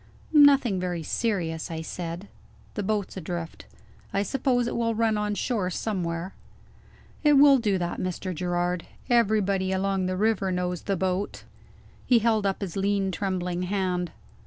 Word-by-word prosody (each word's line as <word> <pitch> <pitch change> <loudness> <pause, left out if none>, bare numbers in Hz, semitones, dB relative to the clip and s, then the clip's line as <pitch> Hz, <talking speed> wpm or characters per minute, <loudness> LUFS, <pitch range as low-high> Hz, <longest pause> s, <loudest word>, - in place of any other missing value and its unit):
"Nothing 280 -9 +6
very 175 -2 -3
serious," 170 -5 -1
I 160 -1 -4
said. 175 +3 -6 0.5
"The - - -3
boat's 205 -1 -2
adrift. 170 -2 -6 0.4
I 200 - +1
suppose 245 +2 +1
it 235 - -3
will 230 -1 0
run 220 -1 +2
on 210 0 -1
shore 205 -5 -1
somewhere." 180 -2 -3 0.9
"It 295 -1 +5
will 280 -1 +7
do 205 -4 +1
that, 175 -1 -3
Mr. 185 0 -3
Gerard; 175 0 -1 0.2
everybody 200 -5 +2
along 190 0 0
the 185 0 -2
river 205 -2 +1
knows 180 -1 -2
the 195 -2 -1
boat." 190 +2 -2 0.6
He 245 - +6
held 220 -2 +2
up 195 - -2
his 190 -4 -4
lean 195 0 +1
trembling 180 -2 -2
hand. 180 -2 -1
195 Hz, 150 wpm, -26 LUFS, 180-215 Hz, 0.9 s, will